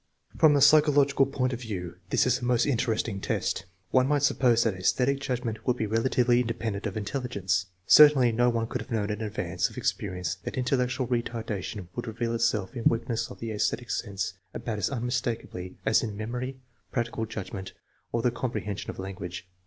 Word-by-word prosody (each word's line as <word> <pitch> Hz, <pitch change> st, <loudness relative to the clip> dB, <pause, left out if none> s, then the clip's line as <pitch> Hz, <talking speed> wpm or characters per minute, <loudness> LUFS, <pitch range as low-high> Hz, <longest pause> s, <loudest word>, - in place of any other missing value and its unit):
From 155 Hz, -2 st, +5 dB
the 140 Hz, -, +3 dB
psychological 145 Hz, -2 st, +5 dB
point 130 Hz, -1 st, -1 dB
of 120 Hz, -, -5 dB
view 90 Hz, -7 st, -5 dB
this -, -, +3 dB
is 125 Hz, 0 st, +2 dB
a -, -, -10 dB
most 120 Hz, -1 st, +2 dB
interesting 115 Hz, -6 st, 0 dB
test. -, -, -1 dB, 0.3 s
One 130 Hz, 0 st, +4 dB
might 145 Hz, -1 st, +2 dB
suppose 120 Hz, -4 st, +4 dB
that 115 Hz, -, +1 dB
aesthetic 125 Hz, +9 st, +1 dB
judgment 120 Hz, -4 st, -3 dB
would 125 Hz, -1 st, +2 dB
be 110 Hz, -, 0 dB
relatively 120 Hz, +2 st, +2 dB
independent 115 Hz, -3 st, -3 dB
of 100 Hz, -, -5 dB
intelligence. 100 Hz, -5 st, -1 dB, 0.2 s
Certainly 145 Hz, -4 st, +7 dB
no 120 Hz, +2 st, +3 dB
one 115 Hz, -1 st, 0 dB
could -, -, -4 dB
have -, -, -10 dB
known 110 Hz, -3 st, -1 dB
in 105 Hz, +1 st, -4 dB
advance 95 Hz, -5 st, -1 dB
of -, -, -14 dB
experience 90 Hz, -3 st, -2 dB
that -, -, -5 dB
intellectual 125 Hz, 0 st, 0 dB
retardation 115 Hz, -5 st, -3 dB
would 120 Hz, 0 st, -4 dB
reveal 115 Hz, +1 st, -2 dB
itself 115 Hz, -3 st, 0 dB
in 115 Hz, -, -5 dB
weak 115 Hz, 0 st, +2 dB
ness 115 Hz, +1 st, -1 dB
of 125 Hz, -, -11 dB
the 115 Hz, -1 st, -4 dB
aesthetic 110 Hz, +3 st, -1 dB
sense 100 Hz, -6 st, -2 dB, 0.2 s
about 110 Hz, -3 st, -3 dB
as 100 Hz, -, 0 dB
unmistakably 120 Hz, -7 st, -3 dB
as 110 Hz, -, +4 dB
in 105 Hz, -3 st, -4 dB
memory, 125 Hz, +4 st, -4 dB, 0.3 s
practical 120 Hz, -2 st, -2 dB
judgment, 100 Hz, -3 st, -6 dB, 0.4 s
or 115 Hz, 0 st, -1 dB
the 125 Hz, -, +3 dB
comprehension 110 Hz, -5 st, -4 dB
of -, -, -6 dB
language. 90 Hz, -2 st, -6 dB
115 Hz, 185 wpm, -27 LUFS, 105-125 Hz, 0.4 s, Certainly